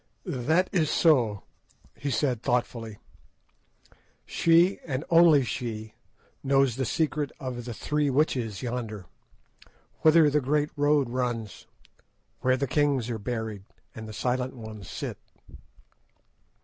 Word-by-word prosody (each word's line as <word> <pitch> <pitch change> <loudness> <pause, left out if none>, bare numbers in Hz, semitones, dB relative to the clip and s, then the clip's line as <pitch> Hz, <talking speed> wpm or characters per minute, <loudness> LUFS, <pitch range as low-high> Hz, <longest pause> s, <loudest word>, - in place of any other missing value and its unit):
"That 160 +9 +1
is 160 -5 +2
so," 120 - +3 0.5
he 140 - -4
said 125 -2 0
thoughtfully. 115 -3 -2 1.3
"She, 170 +3 +3
and 140 -2 -3
she - - -18
only, 120 - +3 0.5
knows 135 -3 +3
the 130 - -1
secret 150 +2 -1
of 125 -3 -5
the 120 - -5
'Three 150 +3 0
Witches,' 130 -7 0
yonder, 115 -5 -4 1.0
whither 160 0 +6
the 150 +1 +2
great 150 +3 0
road 145 -3 +2
runs, 120 -4 -3 0.7
where 130 0 +2
the 140 - 0
kings 135 -3 +1
are 115 - -3
buried, 110 -3 -4 0.3
and 110 0 -8
the - - -7
Silent 125 +3 -2
Ones 110 -4 -9
sit." - - -5
130 Hz, 120 wpm, -27 LUFS, 115-150 Hz, 1.3 s, whither